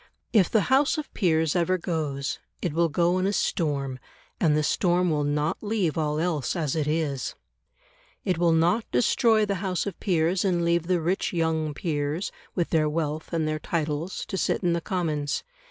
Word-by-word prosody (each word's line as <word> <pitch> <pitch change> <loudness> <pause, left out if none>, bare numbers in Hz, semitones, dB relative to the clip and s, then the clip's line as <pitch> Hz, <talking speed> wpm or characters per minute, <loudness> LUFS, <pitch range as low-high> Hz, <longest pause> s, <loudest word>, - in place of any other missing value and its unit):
If 200 -6 +5
the 220 - +3
House 280 +4 +4
of 305 - -5
Peers 160 -5 +2
ever 180 +1 +2
goes, 150 -6 -2 0.2
it 170 - -2
will 170 +1 +2
go 175 +4 +2
in 185 - +1
a - - +1
storm, 140 -9 -1 0.4
and 150 -3 +3
the 155 - +1
storm 175 +2 +2
will 150 -1 +1
not 150 +2 -1
leave 205 -7 0
all 150 -1 0
else 160 -4 -1
as 155 -5 -1
it 155 -2 0
is. 150 -4 -1 0.9
It 180 -3 0
will 170 -1 +4
not 170 +7 +2
destroy 215 - +3
the 200 -2 -2
House 185 -3 -1
of 200 - -5
Peers 175 -1 +1
and 175 -3 +1
leave 170 0 +1
the 180 -1 +2
rich 180 +4 -1
young 160 -3 0
peers, 150 +2 -2 0.2
with 175 -3 -1
their 155 -2 +3
wealth 155 0 -3
and 165 -2 0
their 155 0 -1
titles, 160 +2 -2
to 190 - -3
sit - - 0
in 175 -1 +2
the 170 - -1
Commons. 155 -5 -1
165 Hz, 185 wpm, -26 LUFS, 150-180 Hz, 0.9 s, If